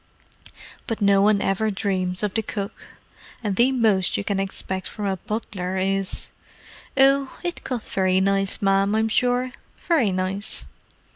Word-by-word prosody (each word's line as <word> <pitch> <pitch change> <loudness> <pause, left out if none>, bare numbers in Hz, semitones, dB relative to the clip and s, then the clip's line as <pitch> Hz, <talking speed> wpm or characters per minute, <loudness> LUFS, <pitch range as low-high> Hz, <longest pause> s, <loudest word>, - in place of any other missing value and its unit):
But 225 - -2
no 200 -1 +4
one 205 0 +4
ever 205 +3 +1
dreams 190 -2 -1
of 205 -2 0
the 225 - +1
cook; 205 -1 -6 0.6
and 205 -3 -1
the 245 +5 +4
most 215 -7 +2
you - - -2
can 200 -1 -1
expect 190 -1 -3
from 210 - -5
a 195 -1 0
butler 190 -2 -4
is, 195 0 -1 0.7
'Oh, 275 0 +4
it 350 0 -4
cut 245 -4 -3
very 185 -1 +1
nice, 195 +1 0
ma'am, 195 +1 +3
I'm 220 0 +2
sure. 250 +2 +1 0.3
Very 290 - +2
nice! 185 +2 -3
200 Hz, 150 wpm, -24 LUFS, 190-225 Hz, 0.7 s, no